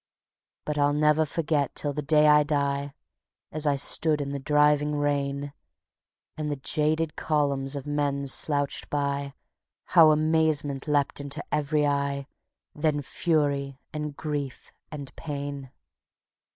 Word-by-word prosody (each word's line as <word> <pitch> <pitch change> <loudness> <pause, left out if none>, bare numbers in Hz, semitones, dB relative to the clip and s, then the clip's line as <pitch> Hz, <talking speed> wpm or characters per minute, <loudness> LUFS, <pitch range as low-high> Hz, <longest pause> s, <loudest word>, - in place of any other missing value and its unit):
But 150 -1 -2
I'll 145 0 +3
never 150 +1 +3
forget 150 -3 -1
till 145 -1 -1
the 150 - -3
day 150 +1 +4
I 150 0 +7
die, 140 -1 -1 0.6
As 155 0 -1
I 145 - +3
stood 150 +2 +1
in 140 -1 -3
the 140 - -3
driving 150 +1 +3
rain, 140 -1 -1 0.8
And 155 -1 -3
the 145 - -1
jaded 155 +3 0
columns 140 -2 0
of 140 -1 -5
men 145 -1 -1
slouched 145 +1 0
by, 140 -1 -2 0.6
How 165 -3 +8
amazement 155 -2 +1
leapt 145 -1 +1
into 140 +1 -5
every 150 0 +1
eye, 140 -1 -1 0.5
Then 150 -1 0
fury 140 -4 0
and 150 -1 -4
grief 145 -4 -5 0.2
and 145 -3 -8
pain. 140 -3 -5
145 Hz, 130 wpm, -26 LUFS, 140-150 Hz, 0.8 s, How